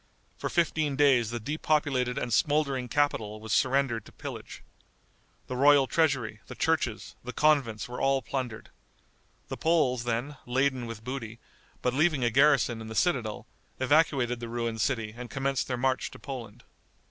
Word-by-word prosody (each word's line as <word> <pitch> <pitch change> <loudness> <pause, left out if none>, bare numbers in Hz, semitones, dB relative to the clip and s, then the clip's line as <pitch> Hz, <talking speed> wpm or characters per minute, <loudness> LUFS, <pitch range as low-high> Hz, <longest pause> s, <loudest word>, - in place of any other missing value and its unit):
For - - -4
fifteen 160 -4 +1
days 135 -6 +4
the 120 0 -3
depopulated 140 -1 0
and 120 -3 -2
smouldering 140 -2 +1
capital 115 -7 0
was 110 -1 -4
surrendered 130 -3 +2
to - - -14
pillage. - - -8 0.8
The 130 - -5
royal 140 +1 +6
treasury, 130 -8 0
the - - -8
churches, 155 -9 -1
the 125 - -5
convents 140 -7 +2
were 125 0 -6
all 135 -1 +2
plundered. 125 -5 -4 0.8
The - - -4
Poles, 130 -8 +2
then, 120 +5 -2
laden 130 -1 0
with 115 -1 -8
booty, 115 -3 -5 0.5
but 125 - +1
leaving 150 -1 +2
a 120 - +2
garrison 135 -3 +3
in 110 - -7
the 110 - -7
citadel, 120 -12 0 0.3
evacuated 130 -3 +2
the 120 -1 -6
ruined 115 -1 -2
city 115 -5 -1
and 120 0 -8
commenced 135 +3 -1
their 125 - -2
march 130 +1 0
to - - -12
Poland. 120 -4 -8
130 Hz, 160 wpm, -28 LUFS, 115-140 Hz, 0.8 s, royal